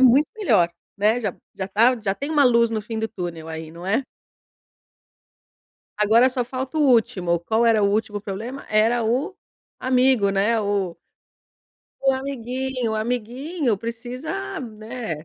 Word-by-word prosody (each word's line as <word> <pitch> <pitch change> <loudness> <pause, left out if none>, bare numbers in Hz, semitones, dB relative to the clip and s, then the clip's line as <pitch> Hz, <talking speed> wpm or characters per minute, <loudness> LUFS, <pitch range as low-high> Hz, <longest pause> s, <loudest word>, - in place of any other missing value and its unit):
muito 260 +4 +6
melhor, 180 - +3 0.3
né, 215 +4 +2
já 205 -6 -3 0.2
já 190 0 -4
tá 235 +4 +3
já 195 -2 0
tem 280 +8 -5
uma 295 -3 +4
luz 235 -2 +4
no 220 -1 -1
fim 220 +1 -5
do 220 - 0
túnel 175 -6 -6
aí, 160 0 -6
não 170 +2 -10
é? 225 +8 +1 1.9
Agora 220 +4 +5
só 255 -1 -1
falta 260 +4 -5
o - - +3
último. 205 -10 +3
Qual 220 +6 +1
era 225 -2 +4
o 200 - +4
último 210 0 -1
problema? 220 +7 -6
Era 225 +2 +3
o 255 - 0 0.4
amigo, 255 -5 +3
né, 200 +4 +2
o 200 -4 -1 1.1
o 270 0 +4
amiguinho, 260 -2 -3
o - - -1
amiguinho 245 - -1
precisa 230 - -5
na 215 - -6
230 Hz, 150 wpm, -23 LUFS, 205-255 Hz, 1.9 s, muito